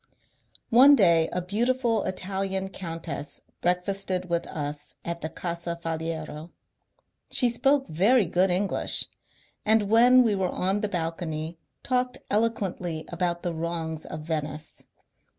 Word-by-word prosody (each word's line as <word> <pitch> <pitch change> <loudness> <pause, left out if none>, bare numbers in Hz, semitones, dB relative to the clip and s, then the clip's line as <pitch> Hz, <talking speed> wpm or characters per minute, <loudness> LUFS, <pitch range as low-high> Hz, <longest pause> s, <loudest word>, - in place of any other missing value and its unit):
One 265 +5 +8
day 170 -8 +4
a 180 - -2
beautiful 235 +4 +1
Italian 190 0 -3
countess 165 -5 -5 0.2
breakfasted 180 0 -1
with 170 0 0
us 145 -1 -5
at 170 0 -3
the 160 - -3
Casa 170 0 -5
Faliero. 160 -1 -5 0.8
She 250 - +6
spoke 270 +4 +2
very 200 +8 +3
good 180 +3 +2
English, 190 +3 +2 0.6
and 215 -1 +2
when 245 +3 +7
we 225 -3 +2
were 190 -2 0
on 190 +4 -1
the 210 - -1
balcony 165 -2 -3 0.2
talked 250 -1 0
eloquently 195 -7 -1
about 175 0 -2
the 175 - -2
wrongs 160 -1 -4
of 155 - -6
Venice. 155 -1 -5
180 Hz, 125 wpm, -26 LUFS, 165-210 Hz, 0.8 s, One